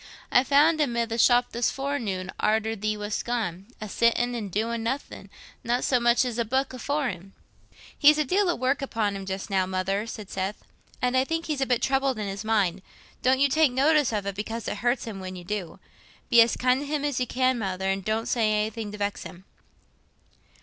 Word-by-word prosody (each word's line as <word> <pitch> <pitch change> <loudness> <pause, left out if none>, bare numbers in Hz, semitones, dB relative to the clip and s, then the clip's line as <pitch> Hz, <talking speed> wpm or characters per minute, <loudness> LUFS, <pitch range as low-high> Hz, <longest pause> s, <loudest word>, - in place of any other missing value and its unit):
I 250 - +5
found 300 +4 +4
him 245 -5 0
i' 235 - +2
the 230 +1 -4
shop 245 +1 +4
this 235 0 0
forenoon, 225 -10 -3
arter 220 +1 +1
thee 215 0 -2
wast 210 0 -3
gone, 205 -6 -3
a 215 - -6
sittin' 235 +3 +1
an' 225 -4 -4
doin' 225 +4 -2
nothin'—not 245 0 -4
so 255 - +2
much 240 +1 +3
as 240 -1 -3
a - - +3
booke 260 +4 -1
afore 280 +2 -1
him." 190 +1 -9 0.6
"He's 300 +1 +6
a 305 - +1
deal 380 +6 +2
o' 345 - +1
work 260 +3 0
upon 220 -6 -1
him 195 -1 -7
just 190 +2 -5
now, 190 -1 +1
Mother," 195 +3 -1
said 215 -3 -8
Seth, 190 +2 -4 0.4
"and 250 0 +1
I 260 - +4
think 325 +4 -3
he's 300 -3 -2
a 270 - +1
bit 245 -2 +1
troubled 270 -1 +1
in 210 -2 -3
his 195 +2 -5
mind. 200 -4 +1 0.4
Don't 260 +1 +3
you 280 - +5
take 305 0 +3
notice 285 +1 +3
of 210 -3 -2
it, 200 - -2
because 225 +3 -5
it - - -3
hurts 240 +4 0
him 215 -4 -6
when 185 0 -7
you 180 - -9
do. 185 -2 -5 0.5
Be 235 -1 +8
as 230 - +3
kind 250 +1 +2
to 285 - -5
him 295 0 -1
as 285 -3 -1
you 250 - -1
can, 255 0 +1
Mother, 190 -2 -2
and 195 0 -1
don't 220 +3 -1
say 225 -3 +1
anything 215 0 -2
to - - -6
vex 205 0 -2
him." 180 +2 -10
230 Hz, 220 wpm, -26 LUFS, 205-260 Hz, 0.6 s, Be